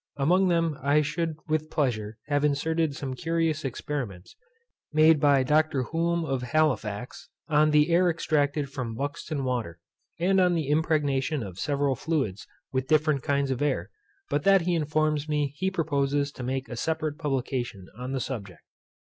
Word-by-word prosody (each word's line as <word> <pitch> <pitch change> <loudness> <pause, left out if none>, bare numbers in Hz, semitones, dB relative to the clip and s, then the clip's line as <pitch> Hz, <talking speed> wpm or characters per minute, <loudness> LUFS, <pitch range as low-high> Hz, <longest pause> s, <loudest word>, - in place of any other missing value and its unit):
Among 180 +7 +3
them 165 -4 +1
I 145 +3 +3
should 160 +2 -2
with 155 0 -1
pleasure 110 -9 -1
have 145 0 0
inserted 150 +1 +1
some 135 -3 -4
curious 160 +2 -1
experiments, 125 -8 -5 0.6
made 155 0 +5
by 140 -2 +4
Dr. 150 -1 +2
Hulme 165 +4 0
of 135 -4 -1
Halifax, 125 -5 -1 0.2
on 155 0 +4
the 150 +2 +4
air 175 +1 +4
extracted 150 -3 0
from 125 -5 -4
Buxton 145 +2 -3
water, 120 -11 -2 0.4
and 190 +2 +3
on 180 -1 +3
the 155 -4 -1
impregnation 150 -3 +1
of 95 -2 -8
several 140 +1 +1
fluids, 130 - -2 0.3
with 130 0 -1
different 155 -2 +3
kinds 140 0 0
of 130 - -2
air; 135 -12 -1 0.4
but 145 +1 0
that 195 +3 +5
he 175 +1 0
informs 155 -1 0
me 145 -2 0
he 190 +5 0
proposes 145 -5 0
to 135 - -10
make 130 +1 -2
a 120 - -6
separate 155 +3 -2
publication 130 - -2
on 125 +3 -6
the 135 - -1
subject. 100 - -6
145 Hz, 160 wpm, -27 LUFS, 130-155 Hz, 0.6 s, made